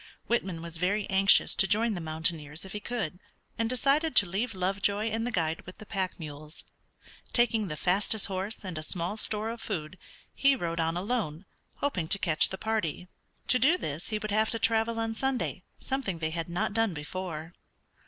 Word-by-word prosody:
Whitman 190 -8 -1
was 170 -1 -7
very 200 +4 0
anxious 195 +1 +6
to 195 - +7
join 220 +3 +2
the 175 - -4
mountaineers 160 0 -2
if 190 - -9
he 210 - -3
could, 205 -6 -3 0.4
and 230 0 +1
decided 275 +6 +2
to 200 - +8
leave 200 +5 -2
Lovejoy 200 +3 0
and 225 +2 -1
the - - -2
guide 165 -6 -1
with 185 - -10
the 215 - -11
pack 190 -4 -3
mules. 150 0 -8 0.7
Taking 225 -3 +3
the 150 -3 -4
fastest 195 +5 +3
horse, 195 +2 -4
and 175 -4 -4
a - - -4
small 170 +5 -2
store 220 0 0
of 235 - -8
food, 180 -3 -4 0.3
he 275 0 +4
rode 170 -7 -3
on 165 +1 0
alone, 195 -5 -2 0.3
hoping 185 - -1
to 200 - +3
catch 170 -5 +3
the 190 - -5
party. 185 -5 -2 0.4
To 250 - +6
do 300 +9 +5
this 155 - -4
he 215 - -1
would 210 0 -4
have 215 +1 +2
to 230 - -1
travel 225 0 +2
on 225 0 -1
Sunday, 265 +2 -1 0.2
something 265 -10 -2
they 160 -1 -2
had 165 +1 -3
not 175 +4 -1
done 225 -5 +1
before. 165 +1 -5
195 Hz, 190 wpm, -29 LUFS, 170-225 Hz, 0.7 s, to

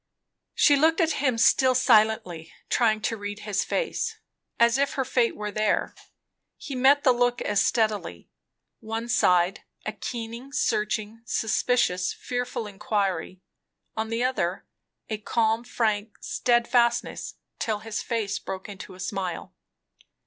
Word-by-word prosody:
She 290 - +5
looked 320 +4 +3
at 330 -2 +3
him 260 -5 +2
still 255 +2 +4
silently, 220 -9 +2 0.2
trying 220 -3 +2
to 225 - -1
read 205 0 -6
his 205 -2 -1
face, - - -2 0.4
as 235 +2 +4
if 280 0 +1
her 265 - -1
fate 245 -2 +1
were 210 0 -4
there. 215 +1 0 0.6
He 290 - -7
met 270 +3 +4
the 260 - +6
look 245 0 +1
as 205 -1 +2
steadily. 210 - -1 0.5
On - - -16
one 225 +2 -3
side, 180 -5 +3 0.2
a 215 - -1
keen, 235 +4 -6
searching, 215 -1 -1
suspicious, 220 -5 +1
fearful 245 -2 -4
inquiry; 195 -3 -2 0.5
on 220 0 -2
the 230 +2 -1
other 190 -8 -1 0.4
a 215 -1 -3
calm, 225 +1 +1
frank, 215 -3 -1
steadfastness; 240 0 +1 0.2
till 215 -2 -1
his 225 0 -4
face 225 -4 -2
broke 190 0 -6
into 195 -2 -9
a - - -15
smile. 185 -1 -4
225 Hz, 135 wpm, -26 LUFS, 205-245 Hz, 0.6 s, the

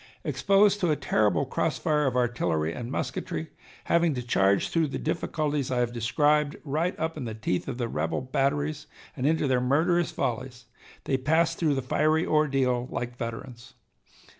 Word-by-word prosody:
Exposed 200 0 +3
to 180 -4 +1
a 155 - +3
terrible 105 - +1
cross - - -1
fire 150 -2 +1
of 130 - -1
artillery 85 -11 0
and 120 0 -6
musketry, 80 -9 -4 0.3
having 170 -3 +2
to 125 - -3
charge 100 -4 +2
through 165 -2 +1
the 140 - -4
difficulties 150 -3 -2
I 130 - -1
have 120 -1 0
described 145 +5 +2
right 160 +5 -1
up 160 0 -2
in 135 - -4
the 110 -2 -5
teeth 110 -5 -2
of 130 -3 -4
the 120 -2 -1
rebel 80 -5 -2
batteries 145 +3 -1 0.3
and 135 -1 -1
into 160 -1 +2
their 130 -2 +2
murderous 165 +7 +2
volleys, 125 -1 -3 0.4
they 135 - 0
passed 160 +5 +1
through 155 -4 +2
the 135 - -2
fiery 155 +5 +2
ordeal 135 -5 +1
like 120 0 -4
veterans. 120 +1 -7
135 Hz, 170 wpm, -27 LUFS, 120-155 Hz, 0.4 s, Exposed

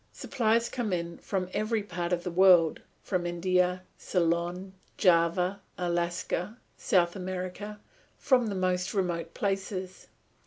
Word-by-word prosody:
Supplies 235 -3 +1
come 240 -5 -3
in 170 -1 -3
from 190 -2 -2
every 215 0 0
part 175 -3 -4
of 175 -1 0
the 180 - -3
world, 175 -3 +5 0.2
from 180 -3 -1
India, 180 +1 +1 0.2
Ceylon, 175 +2 -1 0.2
Java, 180 +1 +3 0.2
Alaska, 175 +3 -2 0.2
South 175 -1 +2
America, 185 +3 -5 0.4
from 250 -4 +3
the 205 - -3
most 185 +1 0
remote 175 -3 -2
places. 195 -2 -3
185 Hz, 120 wpm, -29 LUFS, 175-200 Hz, 0.4 s, world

